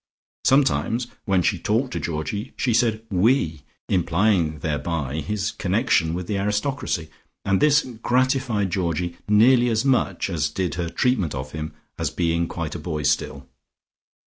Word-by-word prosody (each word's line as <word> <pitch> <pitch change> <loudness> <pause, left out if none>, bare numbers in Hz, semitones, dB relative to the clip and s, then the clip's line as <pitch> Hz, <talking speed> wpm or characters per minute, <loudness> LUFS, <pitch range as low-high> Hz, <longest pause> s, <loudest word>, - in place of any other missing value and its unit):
Sometimes 130 -3 +2 0.2
when 95 -4 +2
she 95 -1 +1
talked 115 +8 0
to - - -2
Georgie 85 +9 -4
she 125 - +1
said 115 -1 +1
"we," 90 - +2 0.3
implying 90 -2 +2
thereby 75 -2 -2
his 105 +7 -2
connection 90 -5 +1
with 90 0 -4
the 100 +1 -2
aristocracy, 105 - -1 0.3
and 100 -1 +2
this 145 -1 +5 0.2
gratified 125 -6 +1
Georgie 85 -1 -1
nearly 120 +4 +5
as 115 +2 0
much 135 -2 +1
as 80 -5 -1
did 90 +3 -2
her 85 -1 -3
treatment 100 - 0
of 65 0 -5
him 75 0 -5 0.3
as - - 0
being 85 -1 0
quite 80 -3 -4
a 85 - -5
boy 75 -1 -4
still. 75 -1 -1
95 Hz, 145 wpm, -23 LUFS, 80-115 Hz, 0.3 s, this